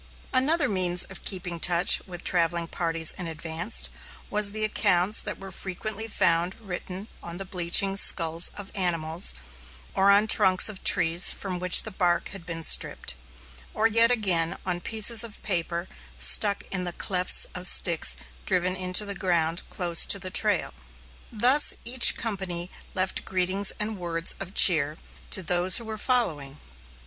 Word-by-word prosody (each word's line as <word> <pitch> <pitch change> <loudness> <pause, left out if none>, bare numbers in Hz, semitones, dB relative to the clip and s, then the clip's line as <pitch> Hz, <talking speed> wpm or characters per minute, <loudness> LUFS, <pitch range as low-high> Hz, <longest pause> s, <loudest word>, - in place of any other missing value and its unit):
Another 285 +4 +1
means 180 -4 -2
of 190 - -12
keeping 180 -2 -6
in 170 - -9
touch 175 +2 +3
with 175 -2 -11
travelling 170 -1 -1
parties 165 -1 -1
in 180 - -6
advance 165 +5 -3 0.4
was 210 -1 +3
the 215 +1 -3
accounts 205 -1 0
that 210 - -6
were 195 0 -12
frequently 200 +4 -5
found 175 -3 -1
written 190 -1 -9
on 170 0 -10
the 195 - -8
bleaching 185 +2 +1
skulls 165 -3 +3
of 200 -1 -11
animals, 170 -3 0 0.6
or 195 +1 +1
on 200 +2 +3
trunks 190 -3 +4
of 200 -3 -11
trees 170 +2 +5
from 185 -3 -6
which 180 0 +4
the 220 - -6
bark 175 -2 -2
had 190 -3 -12
been 165 -1 -7
stripped, - - +2 0.6
or 215 - -2
yet 230 +1 +4
again, 185 -9 +1
on 180 -1 -3
pieces 220 +3 +2
of 225 -3 -9
paper 170 -2 -3 0.3
stuck 60 - +3
in 185 -2 -2
the 175 -1 -6
clefts 180 0 +1
of 180 0 +2
sticks 165 - +2 0.3
driven 180 +1 -1
into 185 +2 +3
the 200 - -6
ground 170 -3 -2
close 175 -2 0
to - - +1
the 185 -1 -8
trail. 205 -3 -1 0.6
Thus 250 +7 +3
each 240 +1 +5
company 190 -6 -6 0.2
left 185 0 -3
greetings 190 +2 0
and 210 -1 -3
words 170 -1 -2
of 195 0 -10
cheer 155 -4 +6 0.3
to 190 - +4
those 175 +2 +1
who 235 - -7
were 220 0 -8
following. 155 - -2
185 Hz, 160 wpm, -24 LUFS, 170-205 Hz, 0.6 s, cheer